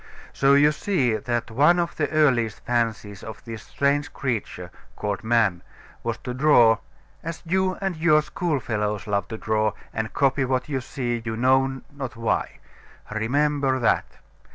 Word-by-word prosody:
So 135 +1 +4
you 145 +1 +5
see 150 - 0
that 120 -1 -2
one 150 +9 +4
of 170 -1 -1
the 145 - -1
earliest 130 -8 +2
fancies 110 -4 -1
of 110 +1 -9
this 115 -2 -7
strange 140 +1 0
creature, 110 -8 -4 0.2
called 105 0 -3
man, 110 -6 +2 0.4
was 115 -1 -2
to 125 - -4
draw, 125 -5 +5 0.4
as 165 0 -6
you 185 +2 +1
and 190 -2 -1
your 155 -1 +4
schoolfellows 110 - -2
love 100 -2 -1
to 110 - -6
draw, 110 -1 0 0.2
and 110 0 -3
copy 135 -1 +2
what 130 -1 -1
you 135 -3 -2
see, 120 -2 -3
you 110 -1 -4
know 130 +2 +2
not 135 -3 -6
why. 115 -1 -1 0.5
Remember 135 +4 +1
that. 120 -3 +2
125 Hz, 155 wpm, -24 LUFS, 110-145 Hz, 0.5 s, you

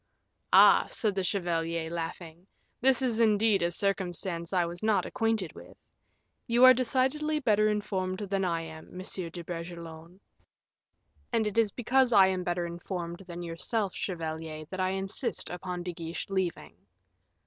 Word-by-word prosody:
"Ah!" - - +7
said 215 -3 0
the 190 -1 -1
chevalier, 170 -3 -1
laughing, 170 +1 -6 0.3
"this 265 +1 +3
is 235 -3 0
indeed 215 -2 +3
a 170 - +2
circumstance 175 -2 -1
I 180 -3 +2
was 170 +1 -7
not 215 -1 +2
acquainted 220 -7 -1
with. - - -13 0.7
You 240 +1 +3
are 255 - +10
decidedly 265 +5 0
better 215 -6 +3
informed 190 -3 -1
than 195 -1 -1
I 170 -2 0
am, 160 +2 -10
Monsieur 185 -2 -4
de 170 +1 -8
Bragelonne." 170 0 -8 1.1
"And 230 -2 +1
it 210 +2 0
is 220 -3 +3
because 250 +1 +2
I 195 -2 +8
am 185 -1 -1
better 175 -1 -1
informed 170 0 -5
than 175 0 -6
yourself, 185 +4 -2
chevalier, 160 -3 -5
that 190 - -5
I 185 0 +1
insist 195 +6 -2
upon 180 0 -5
De 180 0 -4
Guiche 165 +3 -6
leaving." 190 -3 -2
185 Hz, 150 wpm, -29 LUFS, 170-215 Hz, 1.1 s, are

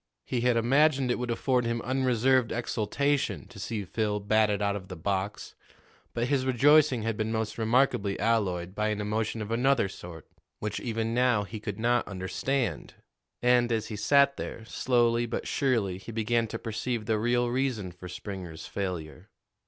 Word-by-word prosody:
He 125 - -1
had 120 -1 +3
imagined 135 +2 +3
it - - -1
would 125 0 -3
afford 125 +1 +1
him 115 0 -1
unreserved 130 -1 +2
exultation 130 +5 -1
to 115 - -12
see 105 +1 -3
Phil 105 +2 -1
batted 105 0 +2
out 100 -1 0
of 95 -2 -7
the 90 - -7
box, 95 +4 -3 0.6
but 120 +1 0
his 135 -1 +1
rejoicing 135 0 +4
had 115 -1 -1
been 110 +1 -2
most 110 0 -2
remarkably 110 -4 +2
alloyed 95 -6 0
by 105 +1 0
an 105 -1 -1
emotion 110 +1 -2
of 105 - -7
another 125 -1 +2
sort, 85 -4 -10 0.3
which 105 -1 -3
even 115 -1 -2
now 120 -3 +3
he 110 +2 -7
could 105 -2 -5
not 120 +2 +1
understand. 100 - -2 0.5
And, 125 -1 +4
as 110 -1 -1
he 110 - -4
sat 140 +5 +4
there, 110 - -6
slowly 120 -1 +1
but 115 - -4
surely 115 -10 0
he 95 - -9
began 115 +1 0
to 115 - -5
perceive 115 +1 -3
the 110 0 +1
real 120 +2 +1
reason 120 -7 -1
for 90 +1 -10
Springer's 90 -3 -7
failure. 90 0 -5
115 Hz, 170 wpm, -28 LUFS, 105-125 Hz, 0.6 s, rejoicing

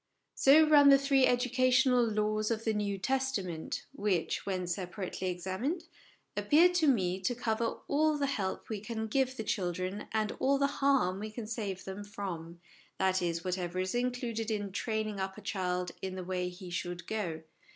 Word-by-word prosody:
So 305 +3 +6
run 290 -2 +7
the 275 - +9
three 275 -1 +3
educational 255 0 +3
laws 215 -1 0
of 225 -1 -1
the 220 - +1
New 205 -1 -1
Testament, 215 -8 -2
which, 200 -4 -1
when 185 -2 -1
separately 185 +1 -4
examined, 190 - -3 0.5
appear 330 +4 +5
to 355 -3 +2
me 190 -8 +2
to 240 +6 -1
cover 230 -1 -1
all 305 +1 +2
the 285 - 0
help 200 -9 -2
we 215 -2 -3
can 220 +1 -4
give 260 +3 0
the 220 - -3
children 185 0 -2
and 215 -1 0
all 275 +1 +3
the 280 - +2 0.2
harm 260 -10 +3
we 215 +1 -4
can 220 +1 -6
save 210 -4 -4
them 195 +2 -6
from 180 -5 -6 0.4
that 190 0 +2
is, 170 -1 -1
whatever 180 -1 -2
is 185 0 -1
included 240 -2 -2
in 205 -2 -2
training 215 0 -2
up 190 +1 -3
a - - -9
child 180 -3 -2
in 190 -1 -4
the 185 - -5
way 180 0 -2
he 180 0 -10
should 175 0 -4
go. 175 -7 -3
210 Hz, 175 wpm, -31 LUFS, 185-250 Hz, 0.5 s, the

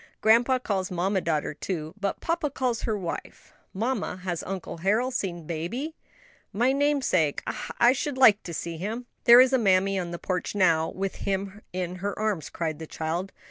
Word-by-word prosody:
Grandpa 235 +4 +4
calls 195 -7 -2
mamma 185 +2 0
daughter 155 -3 -1
too, 160 -1 -4
but 200 -2 -3
papa 335 -3 0
calls 255 -4 -1
her 220 -2 0
wife. 175 -4 -7 0.2
Mamma, 220 -2 -2
has 175 -3 -2
Uncle 190 -3 -5
Harold 220 +8 +1
seen 175 -8 -3
baby?" 175 - -4 0.6
"My 240 +6 +2
namesake! 270 - +1
ah, - - -4
I 240 +1 +6
should 275 0 -3
like 220 -6 +7
to 175 - -7
see 170 +1 -4
him." 220 +8 -4 0.2
"There 240 +1 +10
is 260 +1 +6
mammy 195 -5 +3
on 175 -2 -3
the 170 - -5
porch 185 +3 -3
now, 165 -5 +3
with 195 0 -4
him 195 +1 -3
in 180 0 -3
her 200 +2 -3
arms," 210 -7 -1
cried 160 -2 -3
the 160 - -7
child. 165 +5 -3
195 Hz, 180 wpm, -26 LUFS, 175-240 Hz, 0.6 s, There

